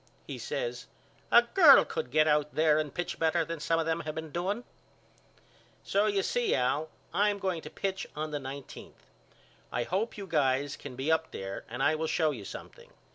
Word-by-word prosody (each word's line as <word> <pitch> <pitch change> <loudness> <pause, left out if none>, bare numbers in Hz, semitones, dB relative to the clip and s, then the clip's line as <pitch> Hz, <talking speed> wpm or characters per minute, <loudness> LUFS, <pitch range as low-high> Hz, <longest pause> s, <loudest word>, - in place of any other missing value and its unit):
He - - -7
says - - -4 0.4
A 235 - +8
girl 305 +11 +7
could 475 - -4
get 155 0 +3
out 150 -1 +1
there 155 -1 +4
and 150 -2 -2
pitch 175 +4 -4
better 165 0 +2
than 165 0 -5
some 165 +2 +1
of 165 - 0
them 160 0 0
have 155 0 -5
been 160 -1 -6
doing. 195 +8 -2 1.2
So 200 +2 +2
you 200 -2 +1
see 245 +4 +1
Al 140 +5 0 0.2
I 205 +1 +3
am 205 - -1
going 185 -4 -2
to 150 - -9
pitch 190 +3 -3
on 155 +1 -3
the 145 - -2
nineteenth. 135 0 -9 0.7
I 120 - -1
hope 200 - -2
you 200 - -6
guys 140 -4 +1
can 140 -3 -9
be 135 +5 -1
up 160 0 +1
there 95 0 -6
and 120 +4 -3
I 155 - +4
will 160 +1 -1
show 155 -1 +2
you 115 -8 -7
something. - - -10
160 Hz, 200 wpm, -30 LUFS, 145-190 Hz, 1.2 s, A